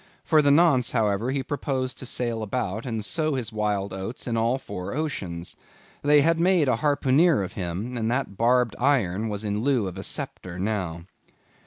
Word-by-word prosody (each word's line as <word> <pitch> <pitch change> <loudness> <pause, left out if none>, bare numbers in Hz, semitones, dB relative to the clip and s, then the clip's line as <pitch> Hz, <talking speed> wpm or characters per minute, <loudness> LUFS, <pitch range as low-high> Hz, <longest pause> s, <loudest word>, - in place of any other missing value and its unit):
For 155 -2 +4
the 145 - +3
nonce, 140 -5 +4
however, 110 0 +1
he 135 0 -1
proposed 130 -2 -3
to 130 - -4
sail 120 -2 -2
about, 110 0 -3
and 110 -3 -3
sow 155 +1 0
his 120 -4 -3
wild 105 -2 -1
oats 95 +6 -5
in 120 - -1
all 115 +3 +1
four 100 -5 -6
oceans. 95 - -4 0.5
They 145 0 +5
had 165 +2 +2
made 175 -4 +3
a 125 - +2
harpooneer 145 - +3
of 95 - -6
him, 95 +7 -4
and 115 -2 -1
that 125 -4 -1
barbed 120 +1 +2
iron 115 -6 +1
was 105 0 -4
in 105 0 -1
lieu 130 -4 +2
of 95 0 -6
a - - -5
sceptre 90 -1 -4
now. 90 -4 -2
115 Hz, 185 wpm, -25 LUFS, 100-140 Hz, 0.5 s, They